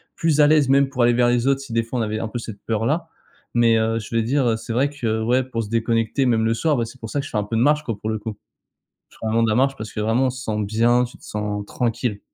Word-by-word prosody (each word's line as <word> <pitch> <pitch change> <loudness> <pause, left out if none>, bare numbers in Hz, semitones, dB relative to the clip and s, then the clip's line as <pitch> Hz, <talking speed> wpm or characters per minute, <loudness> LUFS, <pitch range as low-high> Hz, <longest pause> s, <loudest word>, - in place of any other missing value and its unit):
plus 160 -2 +1
à 145 - +7
l'aise, 150 -3 +4
même 140 0 +4
pour 130 -3 -1
aller 120 - +5
vers 120 0 +3
les 120 0 +1
autres, 135 0 +3
si, 135 -4 -8
des 115 0 +2
fois, 120 +2 -4
on - - +1
avait 110 0 -2
un 115 - -3
peu 120 - -4
cette 110 -3 -8
peur-là, 140 +10 -1 0.4
mais 115 -1 +4
heu, 115 +1 +1
je 105 +2 -7
vais 115 - +3
dire, 130 +1 +1
heu: 115 -1 +1
«C'est 115 - -8
vrai 130 +5 +2
que, 115 -6 -2
ouais, 125 +3 +2
pour 115 -3 -3
se 105 - -8
déconnecter, 115 +3 0
même 115 -3 +2
le 115 - +2
soir, 150 +5 +1
bah, 115 - 0
c'est 125 +3 -12
pour 115 - -6
ça 145 - -2
que 140 - -3
je - - -9
fais 105 - -2
un 105 - +1
peu 110 +2 -3
de - - +2
marche, 150 +3 +3
quoi, 115 -7 -4
pour 110 - -4
le 110 -1 -2
coup». 105 -1 -6 0.7
Je - - -20
fais - - -4
vraiment 115 +1 +2
de 115 - +2
la 110 - +1
marche 135 +1 +2
parce 110 -4 -7
que, - - -4
vraiment, 115 +5 +2
on - - +1
se 130 +1 -8
sent 105 -1 -1
bien. 115 +4 +2
Tu 120 - -10
te - - -19
sens 105 -1 -3
tranquille. 115 -3 -2
115 Hz, 320 wpm, -22 LUFS, 110-130 Hz, 0.7 s, à